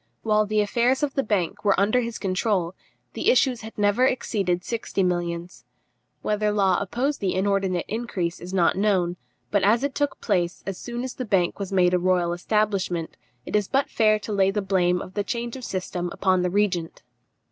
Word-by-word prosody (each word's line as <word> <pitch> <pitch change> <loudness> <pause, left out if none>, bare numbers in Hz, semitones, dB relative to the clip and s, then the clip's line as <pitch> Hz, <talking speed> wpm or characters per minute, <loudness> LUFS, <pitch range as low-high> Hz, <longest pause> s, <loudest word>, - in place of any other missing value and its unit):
While 215 -1 +2
the 215 0 +2
affairs 240 +6 +1
of 280 -2 0
the 275 - +1
bank 205 -8 -1
were 200 -2 +3
under 215 +5 +3
his 235 -1 -4
control, 190 -2 0 0.4
the - - +1
issues 265 - +3
had 220 0 -10
never 205 +4 +2
exceeded 195 -8 0
sixty 225 -3 -2
millions. 175 -5 -2 0.6
Whether 210 0 +1
Law 195 -3 +2
opposed 250 +9 -1
the 190 -2 0
inordinate 190 -2 0
increase 200 -7 -3
is 180 - -8
not 185 -3 +3
known; 185 -3 +1 0.3
but 205 - +3
as 220 +6 +3
it 280 -1 -1
took 290 0 -1
place 175 -5 -1
as 195 -2 -5
soon 240 0 -5
as 260 - -4
the 255 - -5
bank 195 -6 +1
was 200 -1 -4
made 180 -2 +3
a 180 - +3
royal 180 -1 +1
establishment, 185 -3 -1 0.3
it - - -4
is 205 -2 +2
but 275 +1 0
fair 215 -1 +3
to 210 0 -6
lay 195 -1 +3
the 200 +2 -1
blame 180 -2 +1
of 185 - -11
the 205 - -1
change 235 +2 -4
of 260 - -8
system 180 -3 -3
upon 185 -1 +1
the 180 - +1
regent. 180 -6 -1
200 Hz, 195 wpm, -24 LUFS, 180-220 Hz, 0.6 s, were